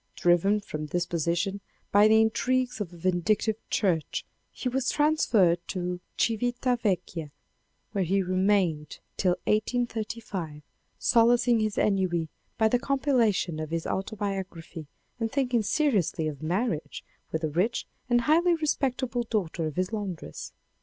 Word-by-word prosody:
Driven 185 +4 +3
from 155 -5 -5
this 175 +3 -1
position 170 +4 -1 0.3
by 205 +1 +6
the 220 0 +6
intrigues 250 +2 +1
of 185 -4 -4
a 175 - -12
vindictive 185 +5 +1
Church 170 -7 0 0.3
he - - -5
was 255 0 0
transferred 235 - +3
to 180 -1 -3 0.2
Civita 245 +2 +1
Vecchia 175 -6 -1 0.6
where 195 -2 0
he 195 +3 +1
remainted 185 -5 +1 0.2
till 180 -2 +2
1835, 215 -8 -2 0.3
solacing 235 0 +4
his 215 -1 -1
ennui 185 -5 +1 0.3
by 220 - +4
the 245 +3 +2
compilation 245 - +1
of 155 -1 -4
his 165 0 -2
auto 195 +3 -3
biography 190 -6 -5 0.3
and 225 -1 -1
thinking 250 -4 +1
seriously 210 - +1
of 145 -3 -5
marriage 175 +1 -2 0.3
with 160 +1 -2
the 155 - +1
rich 190 +10 0 0.2
and 240 0 +4
highly 335 +7 +4
respectable 265 -5 -1
daughter 185 -8 -2
of 155 - -6
his 185 +4 -1
laundress. 200 -6 -5
205 Hz, 135 wpm, -27 LUFS, 175-240 Hz, 0.6 s, by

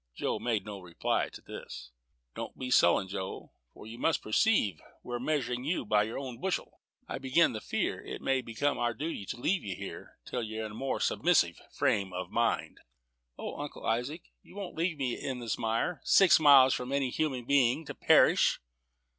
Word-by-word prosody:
Joe - - -2
made 115 -4 -1
no 105 -2 -7
reply 90 -3 -1
to - - -12
this. - - -9 0.4
"Don't - - -7
be 130 -1 -5
sullen, 95 - +4
Joe, 95 0 -6 0.2
for - - -13
you 115 +2 -9
must 160 - +1
perceive 110 - +2 0.2
we're 120 0 -4
measuring 125 -3 -1
you 155 -2 -1
by 105 0 +3
your 110 +2 -3
own 130 -4 -6
bushel. 190 -1 -3 0.3
I - - -4
begin 135 +4 +3
to 110 - -5
fear - - -2
it - - -6
may 135 -1 +1
become 125 +5 -1
our 120 -1 0
duty 145 - -4
to - - -4
leave 180 +9 0
you 95 -3 -4
here - - -9
till 125 - -3
you're 110 0 -4
in 105 - -6
a - - -10
more 135 +5 -2
submissive 150 - +2
frame 95 -2 0
of 90 0 -5
mind." 115 0 0 0.6
"O, - - -6
Uncle 145 - -7
Isaac, 125 +9 -1 0.2
you - - -17
won't 200 -3 -6
leave 165 0 -1
me 130 -4 -1
in 130 -2 -4
this 120 -2 -3
mire, 115 +9 -1
six 195 -4 +6
miles 140 -4 +7
from 125 +1 -3
any 140 -2 0
human 130 -6 -1
being, 140 +3 +3
to - - -6
perish?" - - +4
125 Hz, 190 wpm, -30 LUFS, 110-145 Hz, 0.6 s, miles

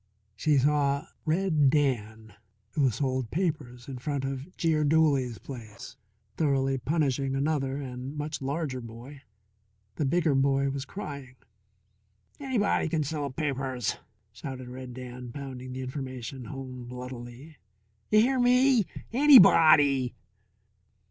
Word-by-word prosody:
She 150 +7 +2
saw 140 0 +2 0.2
Red 160 -3 +2
Dan, 110 -7 -1 0.4
who 140 -4 +2
sold 130 0 -2
papers 130 - -3
in 130 -2 -6
front 140 0 -2
of 135 +6 -6
Jeer 160 -2 +2
Dooley's 145 -6 +2
place, 110 0 -10 0.4
thoroughly 135 -3 +1
punishing 135 -1 0
another 135 -1 0
and 130 +1 -6
much 150 0 -4
larger 140 -1 -3
boy. 120 +5 -11 0.8
The 150 - 0
bigger 160 +1 +2
boy 135 0 +2
was 135 0 -4
crying. 140 -9 -8 1.0
"Anybody 255 - +1
c'n 155 -1 0
sell 145 0 -3
pipers," 130 -4 -2 0.4
shouted 130 -2 -7
Red 125 -1 -8
Dan, 125 -1 -8
pounding 130 -2 -7
the 130 +1 -5
information 130 -1 -6
home 130 -1 -7
bloodily. 125 +4 -9 0.5
"You 215 0 +6
hear 260 +3 +2
me? 250 -3 +4 0.3
anybody!" 155 - +7
135 Hz, 115 wpm, -28 LUFS, 130-150 Hz, 1.0 s, anybody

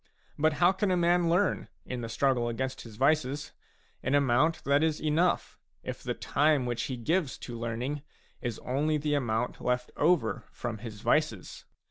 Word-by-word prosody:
But 155 +1 +2
how 175 +4 +4
can 195 +1 0
a 180 - +2
man 175 0 +3
learn, 180 +4 +2 0.2
in 125 -1 -4
the 115 - -5
struggle 120 -1 +1
against 130 +3 -3
his 115 -2 -11
vices, 145 +2 +1 0.5
an 135 +2 +1
amount 145 +4 +3
that 140 +1 +3
is 160 -1 +1
enough, 155 +4 +1 0.2
if - - -5
the - - -3
time 150 -3 +2
which 120 -1 -2
he 130 - -4
gives 155 +4 0
to 120 - -7
learning 120 +5 -3 0.4
is 120 -3 -3
only 150 +4 +1
the 150 0 -1
amount 120 -3 -1
left 125 0 0
over 150 -7 +2
from 115 -3 -5
his 105 -2 -8
vices - - 0
140 Hz, 170 wpm, -29 LUFS, 120-155 Hz, 0.5 s, how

